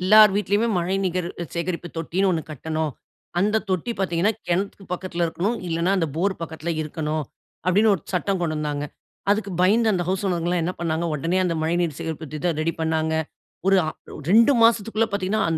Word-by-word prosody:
எல்லார் 210 +2 +7
வீட்லயுமே 210 +2 +1
மழைநீர் 180 0 0 0.3
சேகரிப்பு 170 0 -3
தொட்டின்னு 185 +4 0
1 160 -2 -1
கட்டணும். 155 0 -2 0.5
அந்த 210 +4 +2
தொட்டி 185 +5 0
பார்த்தீங்கண்ணா, 190 +2 +1 0.2
கிணத்துக்கு 195 +2 -1
பக்கத்துல 175 -1 -2
இருக்கணும் 195 +8 -1
இல்லைன்னா, 170 +3 +1
அந்த 165 -3 +1
போர் 190 +3 +1
பக்கத்தில் 160 +1 -4
இருக்கணும். 155 0 -2 0.4
அப்படின்னு 205 +4 +4
ஒரு 170 - -5
சட்டம் 185 +1 0
கொண்டு 155 -3 -1
வந்தாங்க. 145 -1 -2 0.5
அதுக்கு 205 -1 +1
பயந்து 220 +4 +4
அந்த 180 - +1
ஹவுஸ் 190 +2 0
ஓனர்ங்க 175 -2 0
எல்லாம் 175 -2 +1
என்ன 180 - -1
பண்ணாங்க, 165 0 -1
உடனே 165 +5 0
அந்த 170 -2 0
மழைநீர் 165 -2 0
சேகரிப்பு 160 -2 -5
திட்டம் 160 +1 -1
ரெடி 165 +1 0
பண்ணாங்க. 160 0 0 0.5
ஒரு 195 - +6 0.5
2 230 +7 +7
மாசத்துக்குள்ள 225 0 +3
பார்த்தீங்கன்னா 200 +2 0
175 Hz, 160 wpm, -24 LUFS, 160-195 Hz, 0.5 s, எல்லார்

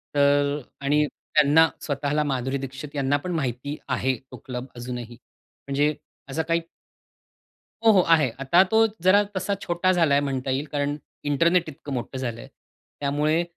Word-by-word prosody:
तर 145 0 +3 0.2
आणि 150 +2 +2
त्यांना 150 +3 +3
स्वतःला, 145 +1 -1
माधुरी 135 -1 -1
दीक्षित 135 +2 -7
यांना 140 0 +1
पण 180 - -3
माहिती 135 0 -3
आहे 130 0 0 0.2
तो - - -8
क्लब. 125 -1 -5
अजूनही 120 -1 -6
म्हणजे 140 +4 -3 0.3
असं 155 +4 -1
काही 170 0 +2 1.2
हो, 225 - +8
हो, 195 -3 +6
आहे. 160 -6 +4
आता 155 +7 +5
तो 220 +4 +4 0.2
जरा 190 +3 +5
तसा 200 +2 -1
छोटा 175 +2 +1
झालाय 165 -6 +3
म्हणता 135 -2 -2
येईल 135 +3 -1
कारण 145 0 -1 0.3
इंटरनेट 165 +4 +2
इतकं 140 -1 -8
मोठं 125 +1 -4
झालंय. 120 -3 -5 0.5
त्यामुळे 150 +4 +1
145 Hz, 145 wpm, -25 LUFS, 135-160 Hz, 1.2 s, हो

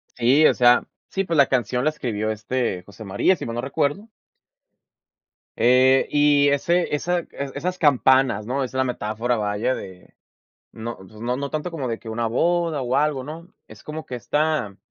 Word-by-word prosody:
Sí, 130 +6 +4
o - - +4
sea, 120 -1 +5 0.3
sí, 195 - -1
pues, 165 -3 -2
la 140 - +6
canción 125 0 0
la 155 - +3
escribió, 110 -7 -3
este, 110 -3 -2
José 100 +3 -12
María, 100 - +2
si - - -7
mal 115 0 -5
no 120 - -2
recuerdo 145 - -2 1.5
eh, 130 +3 +4
y 145 -1 +4
ese 170 +4 +1
esa 175 +4 0
e - - -19 0.3
esas 180 +5 -3
campanas, 130 -6 +3
¿no? 135 +3 -1
Esa 130 +1 -5
es - - +1
la - - +4
metáfora, 120 -1 -2
vaya, 105 +4 -1
de 95 -1 -11 0.6
no, 115 +1 -7
pues, 95 +3 -15
no, 125 +1 -1
no 140 0 -3
tanto 155 +3 -3
como 140 -7 -4
de 115 - -3
que 110 - -9
una 115 +1 -2
boda, 165 +4 0
o 125 +1 -2
algo, 145 -3 0
¿no? 165 +4 -9 0.2
Es 110 -1 -14
como 155 +1 -7
que 125 - -6
está 145 -3 -1
130 Hz, 190 wpm, -23 LUFS, 115-150 Hz, 1.5 s, la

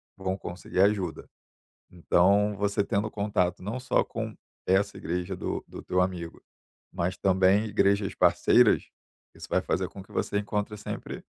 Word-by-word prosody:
vão 95 0 -3
conseguir 90 +1 -3
ajuda. 100 -4 +1 0.6
Então 100 +4 +3
você 100 0 +1
tendo 100 +2 -1
contato 95 -4 -1
não 110 +6 -3
só 130 - +1
com - - -5 0.3
essa 100 +2 +2
igreja 90 +2 -3
do - - -4
do - - -9
teu 90 - -1
amigo, 90 -2 -3 0.5
mas 90 0 -2
também 95 +2 +3
igrejas 100 -1 +1
parceiras, - - +4 0.5
isso - - -10
vai - - +3
fazer - - -1
com 95 - -10
que 95 - -21
você 100 - -1
encontre 105 0 -2
sempre 105 - -6
95 Hz, 150 wpm, -27 LUFS, 90-105 Hz, 0.6 s, parceiras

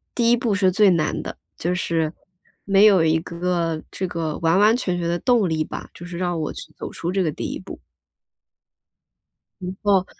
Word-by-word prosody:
第 235 -1 +3
一 240 - +5
步 235 -3 0
是 190 -2 +3
最 205 +2 +5
难 165 -3 0
的， - - -7 0.2
就 175 +2 -1
是 165 -3 -1 0.5
没 200 +1 +5
有 195 -5 +6
一 160 0 +3
个 170 -1 -2
这 185 - -3
个 165 -3 -3
完 165 +2 +3
完 215 +3 +5
全 180 -7 -2
全 170 - -2
的 175 - 0
动 230 -6 +2
力 155 -1 0
吧， - - -7
就 175 - -9
是 175 -1 -7
让 175 -2 -1
我 155 - -3
去 - - -10
走 - - -6
出 170 +2 -4
这 190 -1 +1
个 155 - 0
第 - - -5
一 - - -5
步。 - - -10 1.8
不 180 - -4
过 195 -2 +3
180 Hz, 220 characters per minute, -22 LUFS, 165-195 Hz, 1.8 s, 有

